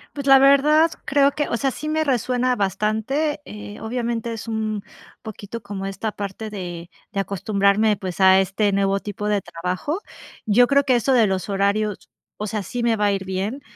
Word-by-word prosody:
Pues 280 -1 -5
la 270 0 +8
verdad, 295 +4 +5
creo 280 0 +3
que, 295 +1 -2
o - - -1
sea, 270 +2 0
sí 305 - -6
me 315 0 +1
resuena 250 -2 0
bastante, 215 - -1
eh, 210 0 -9
obviamente 235 0 -3
es 225 +1 -7
un 215 -2 -2 0.4
poquito 220 +1 -8
como 200 -1 -6
esta 195 +3 -3
parte 205 +2 -6
de 175 -4 -7 0.2
de 200 - -1
acostumbrarme, 200 +2 +1
pues, 185 -2 -6
a 190 0 +6
este 195 +2 0
nuevo 195 0 +1
tipo 205 +1 -4
de 205 -1 +2
trabajo. 180 - -4 0.4
Yo 235 +4 +5
creo 280 +1 +3
que 255 -2 +2
eso 265 +3 +1
de 235 -4 +5
los 190 -1 -2
horarios, 200 +1 -1 0.3
o 210 - -5
sea, 215 0 -2
sí 240 +6 -4
me 230 -2 +2
va 210 - +1
a 205 - +3
ir 195 -1 -2
bien, 195 +8 -3
215 Hz, 190 wpm, -22 LUFS, 195-250 Hz, 0.4 s, la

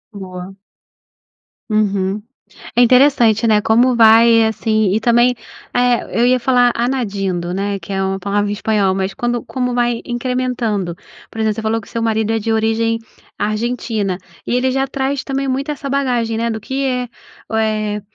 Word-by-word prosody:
Boa. 185 -1 -8 1.2
Uhum. 200 -1 0 0.5
É 240 - +5
interessante, 245 -3 +4
né? 215 -1 +4
Como 240 +4 +3
vai 230 0 +6
assim 220 -2 0
e - - +2
também 240 +2 +3 0.4
eh, 245 -2 +1
eu - - +4
ia 255 +1 +3
falar 245 0 +3
añadiendo, 200 -8 -2
né, 200 +1 -2
que 190 +2 -7
é 195 0 0
uma 190 0 -2
palavra 205 +2 -1
em - - -1
espanhol, 205 -2 +1
mas 190 0 -2
quando 240 +3 -2
como 250 -2 -2
vai 240 -1 0
incrementando. 240 -7 -2 0.3
Por 225 - -9
exemplo, 220 -1 +1
você 220 - -4
falou 220 +1 0
que 220 - -14
seu 230 - -3
marido 220 -1 0
é 225 - 0
de 225 +1 -2
origem 225 +1 +1 0.4
argentina. 215 -2 -2 0.3
E - - -1
ele 255 +1 +1
já 270 +1 0
traz 270 0 -2
também 275 0 -2
muito 270 +2 -2
essa 290 -1 -6
bagagem, 250 -5 0
né, 230 +1 -1
do 220 -1 -3
que 265 +6 -3
é, 250 -2 -1 0.9
eh, 210 - -5
225 Hz, 170 wpm, -17 LUFS, 205-250 Hz, 1.2 s, vai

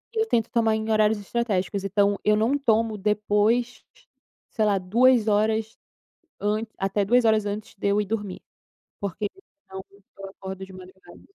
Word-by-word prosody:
Eu 445 -1 +1
tento 230 - +1
tomar 225 -2 +2
em 220 0 -3
horários 215 0 +3
estratégicos, 200 -3 -2
então 200 0 +1
eu 210 - +3
não 225 +7 +1
tomo 225 -5 +1
depois 210 +4 0 0.7
sei 220 - 0
lá 205 -2 +2
2 230 +5 +3
horas 220 +1 +1 0.6
ant 210 +2 -1
até 195 +1 0
2 245 +4 +3
horas 220 -2 +3
antes 205 +1 -5
de 200 - -1
eu 200 +1 +2
ir 210 - -2
dormir. 205 -2 -4 0.6
Porque 200 +1 -3 0.4
senão 190 0 -8 0.3
eu 195 0 -7
acordo 190 0 -8
de 190 - -14
madrugada. 185 -1 -14
210 Hz, 160 wpm, -24 LUFS, 195-225 Hz, 0.7 s, horários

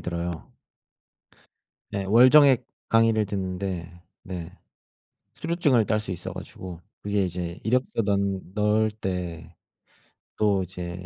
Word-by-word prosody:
들어요. 85 0 -3 1.6
네. 100 -1 -2
월정액 130 +5 +6 0.3
강의를 115 -1 +4
듣는데 90 -3 -4 0.2
네. 90 -3 -7 0.8
수료증을 155 -9 +2
딸 110 0 +1
수 105 -3 -6
있어 90 - -5
가지고 90 -3 -8 0.2
그게 100 -1 0
이제 90 -1 -4
이력서 125 +1 +1
넌 100 -1 0
넣을 105 +1 +2
때 90 -6 -5 0.8
또 100 -3 +2
이제 90 0 -7
100 Hz, 210 characters per minute, -26 LUFS, 90-110 Hz, 1.6 s, 월정액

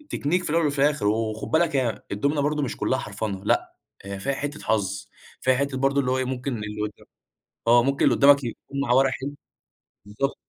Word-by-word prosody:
Technique 175 +6 0
في - - -4
الأول 165 +1 +2
وفي 145 -1 -1
الآخر، 140 -7 +2
وخُد 110 0 -1
بالك 160 -2 +2
هي 125 -4 0
الدُومنة 140 +9 0
برضو 150 +1 0
مش 135 - -3
كلّها 130 - 0
حرفَنة، 100 -4 -4
لأ 355 0 +1 0.3
هي 100 0 -6
فيها 140 +7 -1
حتّة 145 +2 -4
حظ، 100 -2 -1 0.3
فيها 130 0 +3
حتّة 140 0 -1
برضو 135 +1 +2
اللي 130 -2 +1
هو 130 - +1
إيه 130 - 0
ممكن 130 0 -3
اللي 105 0 -5
قد 105 - -2 0.8
آه، 120 0 +6
ممكن 140 +2 +1
اللي - - +4
قدّامك 140 0 +6
يكُون 130 +3 -6
معاه 125 -2 +2
ورق 135 0 +4
حلو 140 +2 -5 0.7
بالضبط. 105 +7 -2
135 Hz, 205 wpm, -25 LUFS, 110-145 Hz, 0.8 s, آه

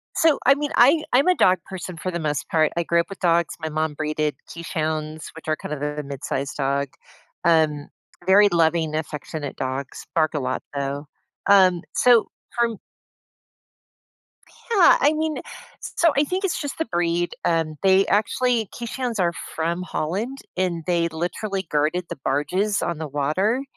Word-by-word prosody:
So, 320 -3 +4
I 275 - +8
mean, 295 0 -3
I 290 +6 +5
I'm 275 +8 +5
a 365 - +4
dog 185 -1 +4
person 185 -1 -6
for 185 +3 -4
the 170 - -3
most 150 -3 -2
part, 155 -2 +2
I 170 - +1
grew 170 +1 +2
up 170 - -1
with 195 - -9
dogs, 170 -2 +2
my 160 - -3
mom 155 0 -1
breeded 155 0 -1 0.2
Keeshonds, 155 -2 -4
which 160 - -12
are 155 - +2
kind 150 - -6
of 145 - -5
a 150 0 -3
mid-sized 140 0 -4
dog. 140 0 0 0.6
Um, 155 -3 +3 0.4
very 205 +2 +7
loving, 165 -2 +2
affectionate 150 -1 -5
dogs, 130 +1 -4
bark 155 -2 +2
a 150 - -1
lot, 130 -1 -2
though. 140 +1 -3 0.4
Um, 185 -3 +5
so, 240 -3 +5 0.3
from 230 -3 +1 1.9
Yeah, 390 -6 +6
I 295 - +4
mean 315 0 -1
s - - -12 0.5
so, 335 - +5
I 285 - +5
think 370 +6 -2
it's 385 - 0
just 285 -1 -5
the 320 - -1
breed, 175 -3 0
um, 165 -2 +1
they 190 0 +5
actually 230 +1 +1
Keeshonds 240 -1 -4
are 170 -2 +2 0.2
from 170 +2 -1
Holland, 200 - -3 0.2
and 175 -3 -1
they 170 -1 +2
literally 190 +4 -3
guarded 155 +4 0
the - - -4
barges 185 +10 0
on 170 -2 -2
the 160 -1 -4
water, 170 - 0
170 Hz, 170 wpm, -23 LUFS, 155-210 Hz, 1.9 s, I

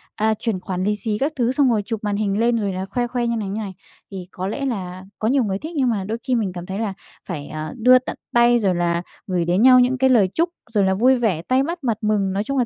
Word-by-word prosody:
à, 220 +1 +1
chuyển 215 -3 -2
khoản 185 0 -4
lì 210 +1 +1
xì 210 +1 -2
các 285 +6 -1
thứ, 245 -2 +1
xong 270 -1 +3
rồi 220 -3 +2
chụp 225 -2 -3
màn 205 -1 -1
hình 205 -1 0
lên 235 +1 +2
rồi 200 -3 -1
là 185 +1 -3
khoe 240 +5 -2
khoe 245 -1 -2
như 235 - 0
này, 205 -3 -3
như 210 +3 -3
này, 195 -2 -6 0.4
thì 185 -2 -7
có 185 +1 -4
lẽ 275 +7 -3
là 185 -7 -4 0.2
có 220 - 0
nhiều 260 +1 +3
người 195 -1 -2
thích. 320 +2 -7
Nhưng 265 -4 +2
mà 210 -4 -1
đôi 215 +4 -3
khi 255 -2 0
mình 210 -5 0
cảm 175 -1 -7
thấy 190 +2 -5
là 215 -4 -2 0.3
phải, 150 -6 -5
ờ, 155 0 -6
đưa 250 +2 +6
tận 255 - -7 0.2
tay, 240 0 +5
rồi 190 -4 +1
là 170 0 0 0.3
gửi 180 -3 0
đến 180 +4 +1
nhau 255 0 +8
những 250 +1 +2
cái 265 +1 +3
lời 220 -7 +5
chúc, 335 +2 +1 0.2
rồi 205 -2 +3
là 190 0 +2
vui 250 +7 +4
vẻ, 220 -10 0
tay 255 +9 +1
bắt 335 +1 -5
mặt 230 -4 0
mừng, 205 -3 0
nói 200 +2 -1
chung 275 +4 -3
là 250 - +2
215 Hz, 295 wpm, -21 LUFS, 190-245 Hz, 0.4 s, nhau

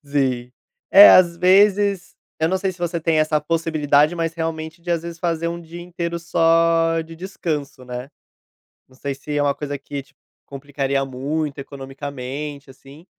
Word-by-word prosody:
Sim, 130 -4 -1 0.4
é, 305 +1 +10
às 170 -2 +6
vezes, 195 +1 +3 0.2
eu 160 - +2
não 190 - +1
sei 190 0 -2
se 180 - -18
você 175 -1 -2
tem 160 -1 +1
essa 155 0 +2
possibilidade, 155 -1 +1
mas, 165 -1 -1
realmente, 160 0 -5
de, 175 +1 -6
às 170 -1 0
vezes, 170 -1 -8
fazer 170 -1 -1
um 170 0 -5
dia 170 +1 -10
inteiro 170 -1 -4
só 165 0 +2
de 165 +1 -12
descanso, 155 -7 -5
né. 125 +2 -7 0.8
Não 130 - -22
sei 140 +1 -4
se 145 +2 -6
é - - +2
uma 140 -1 +2
coisa 145 -1 -5
que, 140 +1 -6
tipo, 140 0 -30 0.3
complicaria 140 0 -2
muito 140 +3 -3
economicamente, 140 +1 -7
assim, 135 +5 -15
160 Hz, 170 wpm, -21 LUFS, 140-170 Hz, 0.8 s, é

